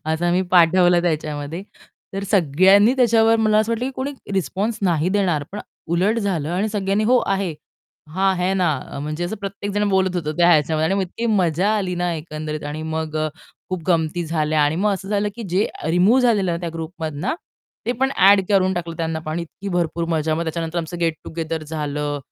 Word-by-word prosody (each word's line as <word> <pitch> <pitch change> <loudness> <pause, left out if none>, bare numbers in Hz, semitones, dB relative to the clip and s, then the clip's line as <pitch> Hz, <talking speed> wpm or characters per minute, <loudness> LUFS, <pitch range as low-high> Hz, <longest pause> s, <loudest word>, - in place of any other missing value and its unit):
असं 175 +2 0
मी 185 +1 +2
पाठवलं 175 0 +5
त्याच्यामध्ये. 155 0 -2 0.5
तर 195 - -3
सगळ्यांनी 195 - +5
त्याच्यावर 225 -2 +4
मला 215 -1 +3
असं 220 +2 +1
वाटलं, 230 +2 -2
की 270 - -3
कोणी 275 +2 -3 0.2
रिस्पॉन्स 200 +4 -1
नाही 170 -3 +2
देणार 185 -6 +1
पण 205 - -5 0.3
उलट 200 +7 +2
झालं 180 -8 -1
आणि 195 +5 0
सगळ्यांनी, 205 0 0
"हो 250 +2 +4
आहे," 195 -3 0 0.6
"हां, 190 +1 +2
है 180 +1 +1
ना." 180 -4 +2 0.2
अ, - - -6
म्हणजे 150 +4 -3
असं 180 +5 -4
प्रत्येक 200 0 -5
जण 205 0 +1
बोलत 190 -1 +1
होतो 155 -3 -2
त्या 175 0 +4
ह्याच्यामध्ये 155 -1 +3
आणि 190 - +1
मग 195 - +1
इतकी 210 +6 -4
मजा 175 +4 +1
आली 190 -3 -2
ना 175 0 -1
एकंदरीत 155 -1 -5
आणि 155 +1 -5
मग 160 -1 -3
अ, 155 0 0 0.4
खूप 185 -2 -3
गमती 170 0 +1
झाल्या 155 -1 +1
आणि 145 +2 +1
मग 205 +2 +2
असं 195 0 -8
झालं 210 0 0
की 235 - -6
जे 195 +4 +2 0.2
रिमूव्ह 195 +9 +4
झालेलं 210 -7 +2
ना 170 - -1
त्या 175 - -3
ग्रुपमधनं, 160 - -4 0.5
ते 245 - +1
पण 265 +2 0
ॲड 195 +1 +6
करून 190 -2 +3
टाकलं 170 -1 -4
त्यांना 160 -1 -2
पण 155 -1 -6
आणि 170 +2 -2
इतकी 195 +4 -8
भरपूर 170 -1 0
मजा. 155 -1 0
मग 165 - -1
त्याच्यानंतर 165 +1 -3
आमचं 170 +1 -5
गेट 165 -1 +1
टुगेदर 160 -1 -4
झालं. 150 -1 -3
175 Hz, 200 wpm, -21 LUFS, 160-200 Hz, 0.6 s, ॲड